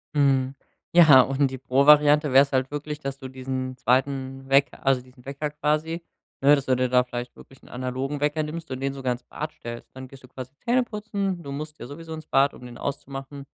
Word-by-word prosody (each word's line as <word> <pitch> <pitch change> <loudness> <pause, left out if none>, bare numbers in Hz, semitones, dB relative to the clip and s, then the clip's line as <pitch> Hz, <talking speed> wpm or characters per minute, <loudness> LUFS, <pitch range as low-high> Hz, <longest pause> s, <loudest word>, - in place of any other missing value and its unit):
Mhm, 135 -2 +2 0.4
ja, 155 -7 +9
und 135 +1 +1
die 130 - -5
Pro-Variante 145 +2 +5
wäre 135 - +9
es 140 - -7
halt 130 -1 +1
wirklich, 150 +1 -5
dass 135 -2 -5
du 130 -1 -8
diesen 130 0 -4
2. 135 +1 -1
Wecker 140 0 +2
also 135 -2 +3
diesen 125 0 -19
Wecker 140 +2 -4
quasi, 155 +3 -1 0.4
ne, 140 +2 +7
dass 140 -2 -3
du 130 - +2
dir 125 0 0
da 125 0 +4
vielleicht 120 0 -6
wirklich 135 - -16
'n - - -16
analogen 130 +3 -3
Wecker 150 +1 0
nimmst 160 +1 -6
und 130 - -4
den 135 0 -1
sogar 130 -2 -1
ins 120 0 -10
Bad 155 +4 -6
stellst. 120 0 -9
Dann 130 -1 -9
gehst 135 -1 -14
du - - -13
quasi 130 0 -9
Zähneputzen, 210 -6 -1
du 140 -4 -8
musst 150 +2 -7
ja 120 - -7
sowieso 160 +3 -9
ins 155 -1 -8
Bad, 140 +1 +3
um 125 - -12
den 120 -1 -10
auszumachen, 140 0 -6
135 Hz, 215 wpm, -25 LUFS, 130-150 Hz, 0.4 s, ja